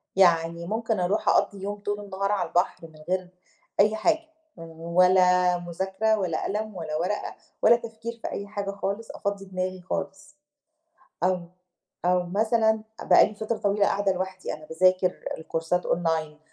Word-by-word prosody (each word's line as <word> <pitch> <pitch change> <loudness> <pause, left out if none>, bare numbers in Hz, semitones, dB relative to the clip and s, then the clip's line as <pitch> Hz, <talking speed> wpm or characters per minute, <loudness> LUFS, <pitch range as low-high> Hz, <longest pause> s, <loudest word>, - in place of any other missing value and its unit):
يعني 170 -2 +3
ممكن 220 +1 -1
أروح 185 +4 +1
أقَضي 200 -2 +2
يوم 205 +1 -4
طول 205 0 -3
النهار 195 0 -2
على 205 - 0
البحر، 175 -2 0
من 155 -1 -18
غير 185 -1 -1 0.5
أي 210 +2 +5
حاجة، 320 +8 +1 0.3
ولا 180 +2 +3
مذاكرة، 190 +5 -1
ولا 175 -5 -1
قلم، 215 +1 -3
ولا 160 -3 -4
ورقة، 180 +6 -2 0.3
ولا 235 - +7
تفكير 230 0 -7
في - - -3
أي 200 - -5
حاجة 200 -1 -3
خالص، 200 +3 -4
أفضي 200 -1 -3
دماغي 185 -1 -3
خالص. 185 +1 -4 1.0
أو 185 0 +2 0.6
أو 180 0 +3
مثلًا 220 +3 +2 0.2
بَقى - - +7
لي 215 - -11
فترة 220 +2 -2
طويلة 205 -1 +2
قاعدة 200 -1 +1
لوحدي، 185 0 -4
أنا 155 0 -12
باذاكر 185 +2 +3 0.2
الكورسات 165 +2 -1
أونلاين، 160 -3 0
190 Hz, 150 wpm, -26 LUFS, 175-210 Hz, 1.0 s, ولا